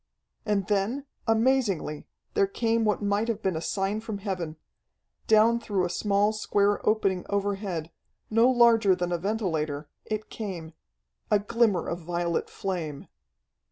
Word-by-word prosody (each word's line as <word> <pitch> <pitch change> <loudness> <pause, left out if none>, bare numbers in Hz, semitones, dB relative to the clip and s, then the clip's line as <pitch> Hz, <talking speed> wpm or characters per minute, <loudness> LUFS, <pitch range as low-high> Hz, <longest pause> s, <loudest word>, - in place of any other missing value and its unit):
And 200 -2 +1
then, 210 +8 0 0.2
amazingly, 225 - +1 0.3
there 405 -2 +3
came 230 - 0
what 210 0 +1
might 205 +2 +1
have 220 -2 -2
been 190 -3 0
a 160 - -2
sign 195 +4 -1
from 220 -2 -5
heaven. 185 -6 -4 0.7
Down 220 +2 +5
through 200 -5 -1
a 175 - -3
small, 205 +2 +2
square 205 -1 +1
opening 195 -4 +1
overhead, 195 -5 -2 0.4
no 230 +3 +5
larger 230 -5 +5
than 175 -1 -2
a 175 - 0
ventilator, 160 -8 -2 0.2
it 215 0 -4
came... 175 -7 -6 0.6
a 210 - +5
glimmer 205 -2 +1
of 170 - -3
violet 170 0 -2
flame! 165 -7 -4
200 Hz, 140 wpm, -27 LUFS, 175-220 Hz, 0.7 s, Down